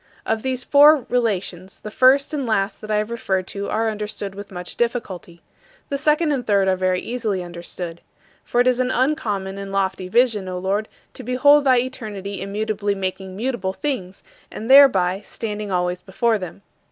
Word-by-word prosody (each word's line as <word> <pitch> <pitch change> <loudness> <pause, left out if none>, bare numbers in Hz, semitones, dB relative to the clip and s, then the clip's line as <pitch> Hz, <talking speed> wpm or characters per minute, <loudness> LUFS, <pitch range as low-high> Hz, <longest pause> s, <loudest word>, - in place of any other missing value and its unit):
Of 225 0 -1
these 255 0 -2
four 290 -1 +6
relations, 195 -6 -2
the 210 - -8
first 270 +6 +4
and 280 -4 -2
last 195 -2 -1
that 215 - -9
I 215 - +1
have 210 +2 -1
referred 190 -5 -1
to 200 0 -4
are 225 +1 0
understood 210 -2 -4
with 200 +1 -9
much 180 -1 -7
difficulty. 195 -8 -3 0.5
The 280 - -1
second 300 +1 +2
and 270 -4 -1
third 200 -2 +3
are 190 - +3
very 185 0 0
easily 220 -6 -3
understood. 170 0 -7 0.4
For 240 - -1
it 250 - +2
is 250 -1 +2
an 255 0 +1
uncommon 210 -8 -1
and 195 0 -7
lofty 190 -1 -1
vision, 220 -2 +2
O 180 - -4
Lord, 195 +4 -1 0.2
to - - -8
behold 280 +4 +4
thy 260 -2 +5
eternity 210 -6 -4
immutably 205 0 -2
making 190 0 -4
mutable 215 -4 -2
things, 200 -9 -4 0.3
and 225 +4 -4
thereby 195 -10 +6
standing 210 -2 -5
always 180 0 -1
before 220 +3 0
them. 185 +1 -8
210 Hz, 175 wpm, -21 LUFS, 190-250 Hz, 0.5 s, four